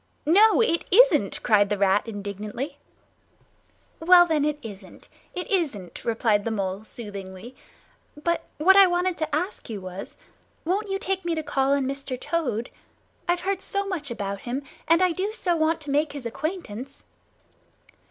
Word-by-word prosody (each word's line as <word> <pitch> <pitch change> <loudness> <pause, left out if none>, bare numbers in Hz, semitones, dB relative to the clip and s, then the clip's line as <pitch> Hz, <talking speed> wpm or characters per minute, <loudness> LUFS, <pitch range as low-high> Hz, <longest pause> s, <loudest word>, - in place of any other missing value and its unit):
"No, 415 +9 +6
it 340 -7 +1
isn't!" - - +4
cried 205 -3 +4
the 205 - 0
Rat 200 +2 +2
indignantly. 210 +5 -5 1.2
"Well 350 +1 +7
then, 315 -4 +1
it 300 -1 0
isn't, 200 -4 -11 0.3
it 360 - -4
isn't," 270 - -2
replied 225 -3 +1
the 230 - -2
Mole 195 -2 -3
soothingly. 205 +1 -9 0.7
"But 340 0 0
what 375 +6 +6
I 395 -1 +8
wanted 355 0 0
to 310 -2 -1
ask 355 - -3
you 215 -3 -4
was, 185 0 -8 0.5
won't 395 +5 -1
you 390 - 0
take 385 -1 -2
me 340 -1 -1
to 315 - -3
call 275 -1 +1
on 280 -1 +1
Mr. 270 -1 -4
Toad? 255 -9 -2 0.6
I've 350 0 +1
heard 390 0 -1
so 400 +1 -1
much 345 -8 -4
about 200 -4 -4
him, 255 +4 -4 0.2
and 335 +3 +5
I 365 - +3
do 390 +5 -2
so 360 -6 0
want 320 0 +1
to 290 -2 -5
make 295 +1 +1
his 280 -4 -7
acquaintance." 275 - -5
290 Hz, 160 wpm, -25 LUFS, 215-355 Hz, 1.2 s, I